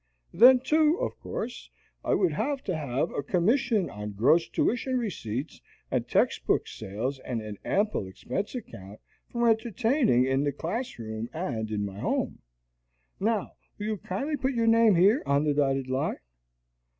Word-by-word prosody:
Then, 250 +7 +8
too, 310 +4 +3
of - - -2
course, 245 +2 -6 0.3
I - - +2
would 365 - +2
have 280 -1 -2
to 185 - -2
have 145 +1 -1
a - - -2
commission 210 - +1
on 105 0 -6
gross 145 +11 +3
tuition 255 +2 0
receipts 150 - -4 0.3
and - - 0
text - - +1
book - - +2
sales 120 +8 -4
and 125 -3 -4
an 105 -2 -7
ample 205 - 0
expense 130 - -4
account 105 - -9 0.3
for 235 0 +1
entertaining 225 - +2
in 135 +1 +1
the 145 -1 0
class 210 - -4
room 110 0 -5
and 125 -10 -3
in 105 -1 -2
my 100 0 -7
home. - - -1 0.8
Now 215 0 0 0.3
will 205 - -5
you 215 0 -1
kindly 275 - -3
put 265 0 -1
your 230 -1 +1
name 225 -2 +5
here 200 - +5
on 140 +1 +3
the 150 -1 +2
dotted 135 -2 +1
line?" 130 +1 -1
175 Hz, 160 wpm, -27 LUFS, -, 0.8 s, Then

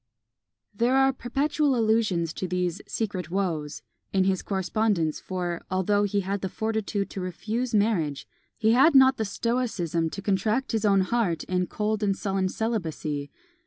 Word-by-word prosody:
There 240 +5 +2
are 270 0 +4
perpetual 275 +3 0
allusions 215 -8 +1
to 185 - -4
these 180 +1 -1
"secret 190 -7 -3
woes" 165 -6 -2 0.3
in 190 -1 +3
his 190 -1 +1
correspondence; 190 -4 0
for, 180 -2 -3
although 205 +2 +2
he 205 0 0
had 195 +1 -3
the 190 - -2
fortitude 220 -1 -2
to 195 - -5
refuse 220 +7 -2
marriage, 185 -10 +1 0.3
he 220 -1 +3
had 270 +6 +5
not 265 0 +7
the 220 - -1
stoicism 200 -8 -1
to 195 - -6
contract 215 +6 0
his 220 -2 0
own 195 -2 +4
heart 185 -5 0
in 180 -1 -1
cold 215 0 -1
and 200 -2 +1
sullen 195 -2 -1
celibacy. 160 -10 -3
200 Hz, 155 wpm, -26 LUFS, 180-225 Hz, 0.3 s, not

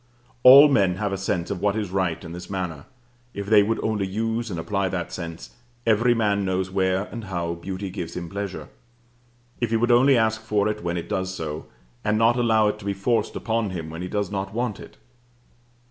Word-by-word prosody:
All 135 +4 +10
men 100 -10 +3
have 100 -1 -2
sense 90 -2 -2
of 95 - -4
what 100 0 +1
is 105 -4 -3
right 95 -4 -1
in 85 - -8
this 90 +1 -8
manner, 90 -6 -4 0.5
if 100 - -4
they 105 0 +6
would 110 +3 0
only 105 -3 0
use 115 +3 -2
and 85 -4 -4
apply 100 +2 -1
that 90 -3 -4
sense; 85 -2 -7 0.3
every 115 +2 +3
man 105 -3 +1
knows 95 -1 -1
where 95 0 +1
and 115 -2 -6
how 85 -3 -3
beauty 95 +3 -6
gives 85 -3 -6
him 85 -1 -5
pleasure, 100 +1 -5 0.9
if 120 - 0
he 115 - +2
would 120 +2 +2
only 130 +2 +5
ask 110 -1 +1
for 105 -2 0
it 105 -2 -3
when 85 0 -2
it 85 - -5
does 95 0 -2
so, 80 -2 -5 0.4
and 105 +1 +1
not 115 +2 +4
allow 110 -3 +3
it 105 0 -2
to 105 - -11
be 100 - 0
forced 105 +5 0
upon 115 -2 -1
him 80 -4 -6
when 80 +2 -7
he 90 - -4
does 105 -2 -2
not 100 +1 -4
want 120 -3 -2
it. - - -12
100 Hz, 210 wpm, -24 LUFS, 90-110 Hz, 0.9 s, All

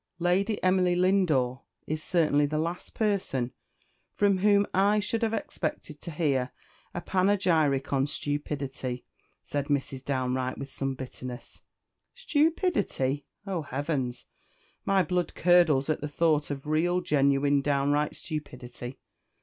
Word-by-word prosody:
"Lady 185 +5 +1
Emily 185 -1 +3
Lindore 170 -9 +2 0.2
is 155 0 -3
certainly 155 -4 +2
the 155 +1 -2
last 170 +3 -3
person 190 - 0 0.6
from 200 -2 +3
whom 205 +1 +4
I 200 +3 +4
should 215 +2 -1
have 225 -1 +1
expected 155 -5 -4
to - - -6
hear 140 -6 0 0.4
a 175 - -5
panegyric 175 -9 +2
on 135 0 +2
stupidity," 140 -4 -3 0.4
said 145 -1 -3
Mrs. 135 -2 -1
Downe 130 -2 -1
Wright, 130 0 -2
with 140 0 -7
some 135 -1 -2
bitterness. 130 -1 -8 0.5
"Stupidity! 295 - 0 0.2
oh, 190 -4 -2
heavens! 135 -3 -3 0.6
my 195 -1 +3
blood 180 +1 -1
curdles 165 -6 +4
at 155 - 0
the 150 - -2
thought 150 0 +1
of 140 -1 -5
real, 170 +4 +1
genuine, 140 -2 +3
downright 145 +1 +1
stupidity! 125 -5 -6
150 Hz, 125 wpm, -28 LUFS, 135-180 Hz, 0.6 s, whom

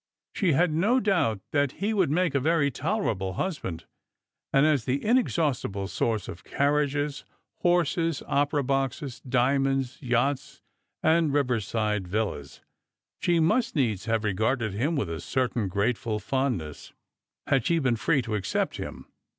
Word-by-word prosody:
She 185 -6 +2
had 170 +4 +3
no 210 +11 +3
doubt 175 - +1
that 145 -3 +1
he 210 +3 -1
would 190 -8 +2
have 150 - +1
made 180 -3 +1
a - - +4
very 145 0 +2
tolerable 125 - -1
husband; 95 - -4 0.7
and 135 +2 +4
as 150 -6 +2
the 130 +2 -1
inexhaustible 150 - +1
source 110 -1 -1
of 85 - -8
carriages, 145 0 0 0.4
horses, 165 -3 +1
opera 145 0 +1
boxes, 135 0 -2
diamonds, 135 +1 +1
yachts, 125 +2 0 0.4
and 160 -1 +3
riverside 110 -7 0
villas, 95 -9 -3 0.6
she 170 -1 +2
must 230 +11 +2
needs 110 - 0
have 115 -1 0
regarded 110 +2 0
him 140 +11 0
with 140 - -1
a 80 -1 -5
certain 125 -5 -1
grateful 110 +4 -1
fondness, 105 - -3 0.5
had 135 -4 +2
she 170 - +2
been 130 -6 +1
free 130 +4 +1
to 115 -2 -4
accept 100 -3 -1
him. - - -7
135 Hz, 140 wpm, -27 LUFS, 110-155 Hz, 0.7 s, a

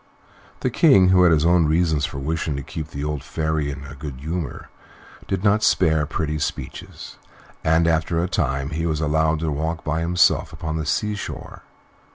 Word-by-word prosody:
The - - 0
King, 95 -2 +5
who 95 -1 +5
had 90 -2 +6
his 80 -1 +3
own 85 -2 +4
reasons 80 -2 +2
for 70 - -8
wishing 75 +1 -2
to 70 - -4
keep 75 +2 -6
the 70 -1 -6
old 75 -2 -3
Fairy 80 0 -2
in 70 0 -6
a 70 - -9
good 70 -1 -7
humor, 80 +2 -5 0.6
did 95 -1 -2
not 105 +1 +3
spare 80 -6 +3
pretty 75 -1 -2
speeches, - - -6 0.5
and 80 +1 +3
after 80 0 +1
a - - 0
time 70 -6 -1
he 80 +2 -2
was 80 -2 -1
allowed 80 +1 +1
to 80 -2 -1
walk 80 +3 -3
by 80 +1 -1
himself 90 +2 +2
upon 80 -1 -4
the 80 -2 -3
sea 105 +8 0
shore. 100 - -7
80 Hz, 190 wpm, -22 LUFS, 75-85 Hz, 0.6 s, had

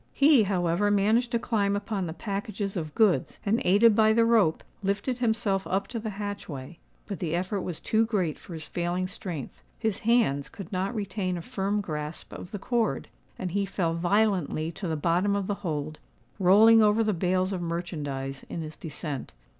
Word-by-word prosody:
He, 280 -3 +6
however 185 +1 +1
managed 215 +4 +3
to 240 - +1
climb 205 -4 0
upon 200 -2 -2
the 160 - -4
packages 200 +2 -4
of 155 -4 -4
goods; 215 -5 +2
and, 220 +4 +2
aided 205 +4 +5
by 220 0 +5
the 230 +1 +4
rope, 220 -9 +3 0.2
lifted 205 +6 -1
himself 220 -5 0
up 195 +1 0
to 235 - -3
the 220 0 -4
hatchway. 175 -8 -6 0.3
But 200 - -5
the 170 -2 -1
effort 190 +3 -1
was 175 -4 -4
too 225 +1 +1
great 185 -9 -1
for 175 - -10
his 155 -2 -5
failing 175 +1 -1
strength: 175 -7 -7 0.2
his 220 -4 -1
hands 220 - +2
could 195 -5 -9
not 195 +4 -1
retain 190 -3 -2
a 170 - -6
firm 200 +4 -1
grasp 150 -3 -6
of - - -8
the 205 - -5
cord; 230 +2 -1 0.3
and 185 -2 -4
he 200 +2 +1
fell 180 -4 -1
violently 175 -3 +1
to 185 +2 -5
the 160 - -1
bottom 175 +6 +2
of 200 -1 -1
the 205 - -1
hold, 155 -3 -3 0.4
rolling 215 +5 +7
over 215 +1 +4
the 215 -1 +1
bales 185 +2 +1
of 180 - -3
merchandize 145 -6 -4
in 165 - -4
his 155 0 -8
descent. 150 -3 -6
195 Hz, 185 wpm, -27 LUFS, 170-215 Hz, 0.4 s, rolling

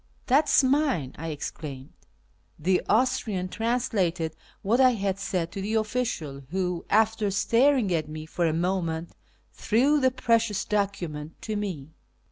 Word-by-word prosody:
" - - -36
That 295 +2 +4
is - - +5
mine," 260 - +1
I 165 - -5
exclaimed. 145 -2 -6 0.6
The 180 +4 +1
Austrian 215 -6 +1
translated 190 -9 -1 0.3
what 230 +6 +3
I 255 -2 +5
had 195 -2 -2
said 180 -3 -2
to 195 - -5
the 210 +3 -2
official, 215 - -2
who, 180 -1 -2
after 220 -1 +2
staring 230 +1 +3
at 155 -2 -1
me 155 0 -6
for 170 +1 -1
a - - +2
moment, 170 -1 -1 0.4
threw 275 +7 +2
the 260 -2 +4
precious 230 -5 +1
document 175 -7 -3
to 215 - -3
me. 180 -9 -4
195 Hz, 145 wpm, -26 LUFS, 165-230 Hz, 0.6 s, is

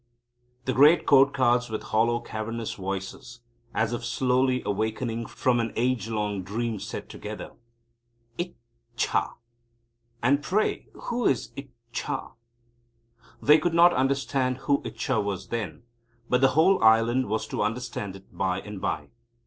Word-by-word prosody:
The 130 - 0
great 150 +6 +6
Court 140 0 +6
Cards 120 -2 +2
with 110 - -4
hollow, 115 +2 +1
cavernous 115 0 -4
voices, 95 +5 -6 0.3
as 110 0 0
if 120 - -3
slowly 125 +2 +1
awakening 110 +3 -2
from 125 -2 +1
an 115 -2 -1
age 120 -1 0
long 105 -3 -1
dream, 110 +3 -3
said - - -6
together: - - -7 0.8
"Ich 175 +5 -4 0.4
cha! - - 0 0.9
And 140 +4 +3
pray 200 +8 0 0.2
who 240 -1 0
is 130 - 0
Ich 135 0 -8 0.2
cha?" - - -3 1.1
They 150 +2 +7
could 165 +2 0
not 175 +1 +7
understand 135 -1 0
who 140 -1 +2
Ichcha 115 -2 -1
was 100 -2 -4
then, 105 -9 -4 0.4
but 125 +1 +2
the 135 0 +4
whole 185 +1 +5
island 115 +3 +4
was 110 +1 -1
to - - -2
understand 105 -3 -3
it 95 - -16
by 95 -1 0
and 105 -2 -8
by. - - -2
120 Hz, 140 wpm, -26 LUFS, 110-135 Hz, 1.1 s, They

